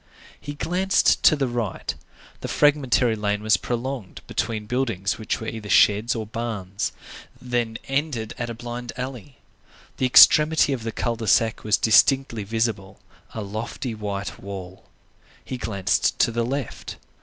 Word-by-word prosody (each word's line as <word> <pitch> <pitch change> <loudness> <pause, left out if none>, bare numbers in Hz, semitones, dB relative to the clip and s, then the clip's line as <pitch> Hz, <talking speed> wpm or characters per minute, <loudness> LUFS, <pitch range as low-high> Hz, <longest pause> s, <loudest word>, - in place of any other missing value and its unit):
He 145 0 -7
glanced 185 +5 +2
to 155 - +7
the 140 -3 -1
right. 120 -5 -3 0.5
The - - -5
fragmentary 135 -5 +2
lane 105 -1 -2
was 110 0 +4
prolonged 120 -3 -4
between 110 -2 -3
buildings 115 -5 -1
which 110 - -2
were 110 - -7
either 110 -2 -6
sheds 105 +5 +4
or 110 -1 -3
barns, 105 -4 -4 0.5
then 120 -3 -2
ended 135 -5 -2
at 120 -1 -3
a 115 - -5
blind 120 +1 -6
alley. 130 0 -7 0.6
The 130 - +1
extremity 150 +3 +6
of 130 - -4
the 115 0 -4
cul 115 +1 -2
de 110 -1 -5
sac 110 +2 +2
was 110 0 +2
distinctly 115 +1 +3
visible,—a 110 0 -4
lofty 110 +4 -5
white 100 -2 -5
wall. 95 -2 -8 0.6
He 130 - -5
glanced 100 -5 0
to - - +3
the 115 0 -1
left. 135 -1 -5
115 Hz, 145 wpm, -23 LUFS, 105-130 Hz, 0.6 s, to